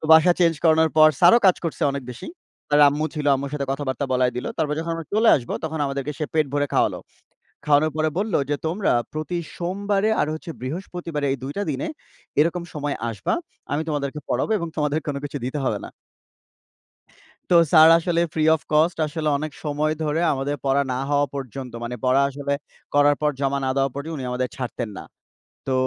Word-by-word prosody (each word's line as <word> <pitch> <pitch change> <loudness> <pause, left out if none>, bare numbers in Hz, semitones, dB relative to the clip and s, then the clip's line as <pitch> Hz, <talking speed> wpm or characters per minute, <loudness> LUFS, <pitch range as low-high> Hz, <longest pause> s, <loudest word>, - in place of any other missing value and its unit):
তো - - -10
বাসা 160 +2 +7
চেঞ্জ 165 -1 +4
করানোর 160 -1 +4
পর 155 0 +8
স্যারও 235 - +7
কাজ 185 - +5
করছে 165 - -3
অনেক 140 -1 -4
বেশি, 120 - -9 0.4
তার 145 0 +5
আম্মু 150 +2 -1
ছিল, 150 -1 -3
আম্মুর 140 +1 -3
সাথে 140 -2 -2
কথাবার্তা 135 0 -3
বলায় 125 -1 +2
দিল। 125 - -3
তারপর 150 -2 0
যখন 165 +1 -3
আমরা 165 -2 -6
চলে 220 +1 +4
আসব, 120 -3 -7
তখন 160 0 -3
আমাদেরকে 140 +1 -3
সে 155 - -1
পেট 155 -2 +3
ভরে 145 0 +1
খাওয়ালো। - - +2 0.7
খাওয়ানোর 150 +1 +3
পরে 155 0 +2
বলল 210 -1 -2 0.2
যে, 145 - +2
"তোমরা 185 +5 0 0.2
প্রতি 155 +3 -3 0.2
সোমবারে 200 +4 0
আর - - +1
হচ্ছে 155 +1 -6
বৃহস্পতিবারে 165 +1 -4
এই 135 - -1
২ 140 +2 -5
টা 205 - 0
দিনে 135 - -3 0.5
এরকম 170 +3 +2
সময় 145 -1 -2
আসবা, 105 - -2 0.4
আমি 145 +2 0
তোমাদেরকে 145 -1 -2
পড়াবো 130 - 0
এবং 170 - -3
তোমাদের 150 0 +1
কোনো 140 -1 -2
কিছু 145 0 -5
দিতে 145 +3 -3
হবে - - 0
না।" - - -9 1.6
তো - - +5 0.2
স্যার 160 0 +9
আসলে 170 0 0
ফ্রি 155 -1 +1
অফ 155 - -3
কস্ট 160 +3 +3
আসলে 155 0 -3
অনেক 155 0 -4
সময় 150 +1 0
ধরে 155 +2 0
আমাদের 140 +2 -2
পড়া 140 +1 +3
না 125 - -2
হওয়া 145 0 +3
পর্যন্ত, 130 -2 -6
মানে 125 +1 -4
পড়া 130 +2 +4
আসলে 140 +1 -4 0.4
করার 145 0 +5
পর 150 - +3
জমা 140 0 0
না 130 - 0
দেওয়া 135 0 +2
পর্যন্ত 155 +3 -5
উনি 130 - -5
আমাদের 125 0 -1
ছাড়তেন 120 -3 -4
না। - - -8 0.6
তো 130 - 0
150 Hz, 195 wpm, -23 LUFS, 140-160 Hz, 1.6 s, স্যার